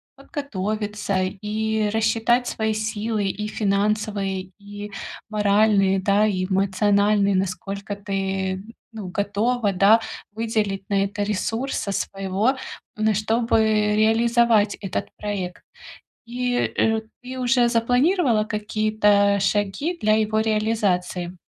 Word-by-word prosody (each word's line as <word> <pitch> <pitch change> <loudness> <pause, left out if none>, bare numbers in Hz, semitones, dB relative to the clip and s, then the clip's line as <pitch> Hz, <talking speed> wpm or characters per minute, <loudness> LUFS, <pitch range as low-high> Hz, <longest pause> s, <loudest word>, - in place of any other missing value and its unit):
подготовиться 210 -7 -3
и 215 +2 -1
рассчитать 225 +3 +2
свои 220 0 -1
силы: 215 0 -2
и 210 +2 -3
финансовые, 200 -2 -1
и 205 0 -9 0.4
моральные, 205 -2 +3
да, 200 +2 +3
и 185 -3 0
эмоциональные, 200 +1 +2
насколько 195 +2 -3
ты, 195 -1 -2 0.3
ну, 205 -5 -6
готова, 205 +3 0
да, 200 +5 +5 0.3
выделить 215 -3 -2
на 195 -1 +2
это 205 +1 -2
ресурса 215 +3 -2
своего, 195 +6 -1 0.4
н 215 0 +2
чтобы 225 +2 +1 0.3
реализовать 225 0 +3
этот 195 -3 -4
проект. 195 -4 -4 0.6
И, 245 +1 -2
э, 225 -2 +1 0.2
ты 255 +1 -7
уже 245 -1 +3
запланировала 245 - +2
какие-то 210 -1 +2
шаги 205 - 0
для 215 0 +3
его 215 0 +1
реализации? 200 -5 0
210 Hz, 105 wpm, -23 LUFS, 195-220 Hz, 0.6 s, да